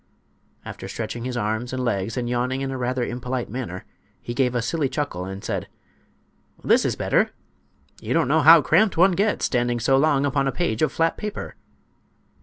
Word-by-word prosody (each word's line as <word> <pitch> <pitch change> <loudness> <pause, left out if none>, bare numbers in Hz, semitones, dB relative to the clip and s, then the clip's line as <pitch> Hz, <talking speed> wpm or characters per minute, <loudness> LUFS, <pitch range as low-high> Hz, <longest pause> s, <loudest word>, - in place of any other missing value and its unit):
After - - -8
stretching 120 0 -5
his 125 -1 -3
arms 110 +3 -2
and 130 -1 -2
legs 110 0 -2
and 120 -1 -2
yawning 125 +2 -1
in 135 0 -3
a 130 - -4
rather 125 0 -1
impolite 125 -1 -4
manner, 110 -7 -5 0.3
he 120 - -6
gave 125 -1 +1
a 120 - +1
silly 145 +2 -1
chuckle 135 - -3
and 95 +1 -7
said: - - -3 1.0
"This - - +3
is - - 0
better! - - +1 0.7
You - - -2
don't - - +2
know 155 +4 +3
how 160 +1 +8
cramped 185 +4 +3
one 190 +3 +6
gets, 205 +4 +1
standing 120 -1 0
so 135 +4 +3
long 140 -1 +3
upon 135 0 0
a - - +1
page 150 -11 -2
of 155 -3 +2
flat 165 0 0
paper." 210 -1 -6
130 Hz, 190 wpm, -23 LUFS, 120-150 Hz, 1.0 s, how